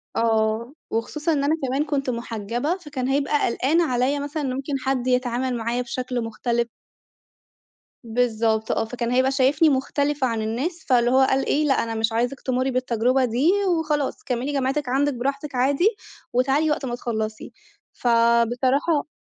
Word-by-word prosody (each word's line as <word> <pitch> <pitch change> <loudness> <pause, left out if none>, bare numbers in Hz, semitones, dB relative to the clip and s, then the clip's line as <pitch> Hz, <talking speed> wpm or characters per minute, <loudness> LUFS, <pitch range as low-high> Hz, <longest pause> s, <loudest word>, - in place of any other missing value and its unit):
آه، 225 +2 +1 0.2
وخصوصًا 300 +8 -1
إن 280 -2 0
أنا 300 +3 +2
كمان 270 +4 0
كنت 280 -3 -1
محجبة، 235 - -2
فكان 290 -7 -5
هيبقى 285 +2 +1
قلقان 280 +8 +1
عليَّ 260 -1 +1
مثلًا 290 +1 -4
إن 255 -2 -1
ممكن 270 +2 -4
حد 260 -2 0
يتعامل 250 0 0
معايا 235 +2 -1
بشكل 250 0 -3
مختلف. 235 +1 -1 1.4
بالضبط، 225 -2 0
آه، - - 0
فكان 235 +1 -3
هيبقى 260 +2 +3
شايفني 275 +4 +3
مختلفة 280 0 0
عن 230 -2 -2
الناس، 270 +11 -3
فاللي 240 -2 +4
هو 260 - +5
قال 270 0 +1
إي: 300 +1 +2
"لأ، 275 - +3
أنا 230 -1 -4
مش 220 +1 0
عايزِك 245 +4 -1
تمرّي 260 +1 0
بالتجربة 255 +1 +1
دي 250 +8 +2 0.3
وخلاص، 300 -3 -2
كملي 255 +3 -2
جامعتِك 275 0 -1
عندِك 280 +3 +1
براحتِك 275 +3 -3
عادي 275 +10 +3 0.4
وتعالي 275 +5 +2
وقت 295 - -1
ما 240 -2 -3
تخلصي." 220 -3 -4 0.4
فبصراحة 245 +6 +2
255 Hz, 155 wpm, -23 LUFS, 235-280 Hz, 1.4 s, هو